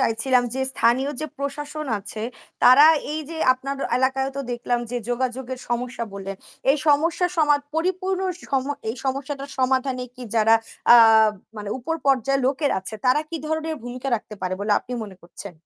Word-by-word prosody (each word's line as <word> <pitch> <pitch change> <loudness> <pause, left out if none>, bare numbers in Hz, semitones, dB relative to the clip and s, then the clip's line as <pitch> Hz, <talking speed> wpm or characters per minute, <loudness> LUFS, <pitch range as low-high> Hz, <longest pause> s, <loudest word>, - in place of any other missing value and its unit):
চাইছিলাম 250 +2 +2
যে 265 - -2
স্থানীয় 250 +5 +2
যে 310 - -2
প্রশাসন 295 +2 -4
আছে 205 +2 -5 0.4
তারা 260 +4 +8 0.3
এইযে 310 +1 -5 0.2
আপনার 275 +2 -5 0.2
এলাকায়ও 265 +1 +1
তো - - -1
দেখলাম 240 0 -1
যে 245 - -2
যোগাযোগের 255 +1 -2
সমস্যা 240 0 -2
বললেন। 195 0 -6 0.3
এই 280 - +4
সমস্যা 325 +5 +3
সমাদ 295 -2 +4
পরিপূর্ণ 370 +3 -1 0.3
সম 265 -2 +1 0.2
এই 225 - -3
সমস্যাটার 275 +1 -3
সমাধানে 260 0 +1
কি 255 - -10
যারা 225 0 +5 0.4
আ - - +10 0.6
মানে 210 -1 -6
উপর 300 +7 -3
পর্যায়ের 275 0 +2
লোকের 280 +2 +1
আছে 195 +3 -3
তারা 255 +4 +4
কি 335 - -3
ধরনের 315 +1 -2
ভূমিকা 245 +2 -5
রাখতে 215 -1 -10
পারে 185 0 -1
বলে 205 +1 +1
আপনি 250 - -9
মনে 195 -3 -11
করছেন? 175 +2 -9
260 Hz, 160 wpm, -23 LUFS, 240-285 Hz, 0.6 s, আ